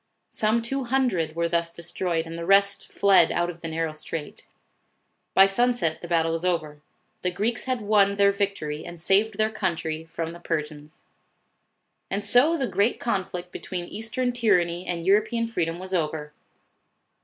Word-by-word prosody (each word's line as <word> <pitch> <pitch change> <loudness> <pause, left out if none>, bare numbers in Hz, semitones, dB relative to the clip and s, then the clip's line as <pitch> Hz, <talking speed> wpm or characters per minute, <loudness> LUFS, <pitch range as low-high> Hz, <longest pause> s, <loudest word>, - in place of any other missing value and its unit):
Some 220 +2 +1
two 270 +3 -2
hundred 235 -12 0
were 170 0 +1
thus 170 0 0
destroyed, 170 0 -2
and 165 0 -7
the 170 - -5
rest 200 +2 +3
fled 195 -4 +5
out 175 0 0
of 170 -1 -16
the 165 - -5
narrow 160 0 -2
strait. 155 0 -6 0.9
By 195 - +8
sunset 195 -5 +1
the 175 - -7
battle 165 -1 +1
was 165 +1 -2
over. 155 -5 -1 0.4
The 180 - 0
Greeks 215 +6 -2
had 255 -3 -1
won 200 -1 +3
their 200 0 +4
victory 195 -7 -2
and 175 -1 -9
saved 200 +5 +2
their 215 0 +1
country 165 -6 -2
from 165 0 -5
the 170 - -10
Persians. 150 -2 -5 1.0
And 200 +1 -1
so 250 +11 +4
the 270 - 0
great 215 0 +1
conflict 180 -5 -3
between 180 -2 -5
Eastern 225 +6 -2
tyr 230 -6 +4
anny 175 +1 -4
and 170 -1 -3
European 215 +4 +2
freedom 170 -7 -2
was 185 +1 -7
over. 150 -3 -2
180 Hz, 165 wpm, -25 LUFS, 165-215 Hz, 1.0 s, By